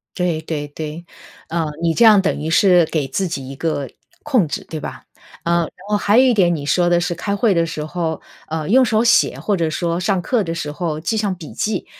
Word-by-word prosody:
对 175 Hz, -3 st, -1 dB
对 155 Hz, -2 st, -4 dB
对。 155 Hz, +3 st, -7 dB, 0.4 s
呃， 165 Hz, 0 st, -1 dB, 0.2 s
你 165 Hz, -1 st, +1 dB
这 235 Hz, -, +4 dB
样 210 Hz, -3 st, +7 dB
等 -, -, -1 dB
于 155 Hz, +2 st, -3 dB
是 180 Hz, 0 st, +5 dB
给 150 Hz, -4 st, -2 dB
自 190 Hz, +8 st, -1 dB
己 135 Hz, -6 st, -5 dB
一 135 Hz, -, -7 dB
个 145 Hz, -3 st, -2 dB, 0.3 s
控 250 Hz, -, +2 dB
制， 145 Hz, -, -4 dB
对 160 Hz, -, -4 dB
吧？ -, -, -8 dB, 0.4 s
呃， 170 Hz, 0 st, +2 dB
然 160 Hz, -, -3 dB, 0.2 s
后 210 Hz, -, +2 dB
还 205 Hz, +2 st, +2 dB
有 255 Hz, -, +7 dB
一 250 Hz, -, +4 dB
点， 175 Hz, -5 st, +3 dB
你 145 Hz, -2 st, -5 dB
说 175 Hz, +4 st, +2 dB
的 175 Hz, 0 st, +3 dB
是 175 Hz, 0 st, -1 dB
开 200 Hz, +4 st, -2 dB
会 210 Hz, 0 st, +2 dB
的 170 Hz, -2 st, +2 dB
时 155 Hz, -2 st, -5 dB
候， 160 Hz, -1 st, -3 dB, 0.3 s
呃， 155 Hz, -1 st, -3 dB
用 260 Hz, +4 st, +6 dB
手 220 Hz, -1 st, +2 dB
写 235 Hz, -, +3 dB
或 205 Hz, -, 0 dB
者 165 Hz, -3 st, 0 dB
说 170 Hz, +1 st, -1 dB
上 190 Hz, -1 st, 0 dB
课 235 Hz, +3 st, 0 dB
的 165 Hz, -2 st, -4 dB
时 150 Hz, -3 st, -4 dB
候 155 Hz, -1 st, -3 dB
记 170 Hz, +8 st, -2 dB
上 205 Hz, -3 st, 0 dB
笔 165 Hz, -4 st, -10 dB
记。 215 Hz, -, -2 dB
170 Hz, 255 characters per minute, -19 LUFS, 160-200 Hz, 0.4 s, 样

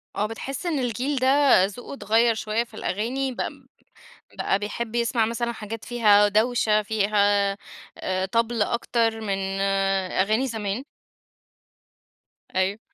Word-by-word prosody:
آه، 205 Hz, -, 0 dB
بتحِسّ 260 Hz, +7 st, -6 dB
إن 325 Hz, -5 st, 0 dB
الجيل 250 Hz, +3 st, -1 dB
ده 265 Hz, -6 st, +5 dB
ذوقُه 210 Hz, +7 st, -8 dB
اتغيَّر 230 Hz, -2 st, +2 dB
شُويَّة 220 Hz, +1 st, -1 dB
في 235 Hz, -, -21 dB
الأغاني، 245 Hz, +6 st, -2 dB
بق 250 Hz, -, -3 dB, 0.9 s
بقى 195 Hz, -, +1 dB
بيحب 220 Hz, +3 st, -5 dB
يسمع 235 Hz, -1 st, +1 dB
مثلًا 235 Hz, +1 st, -2 dB
حاجات 220 Hz, 0 st, -7 dB
فيها 210 Hz, -4 st, +4 dB
دوشة، 215 Hz, 0 st, +2 dB
فيها 205 Hz, -1 st, +2 dB, 0.4 s
آآ 185 Hz, 0 st, -1 dB
طبل 230 Hz, +2 st, 0 dB
أكتر 230 Hz, 0 st, 0 dB
من 200 Hz, -3 st, -2 dB, 0.7 s
أغاني 215 Hz, +7 st, +1 dB
زمان؟ 220 Hz, 0 st, -3 dB, 1.7 s
أيوه. 190 Hz, +3 st, +1 dB
225 Hz, 120 wpm, -24 LUFS, 205-240 Hz, 1.7 s, ده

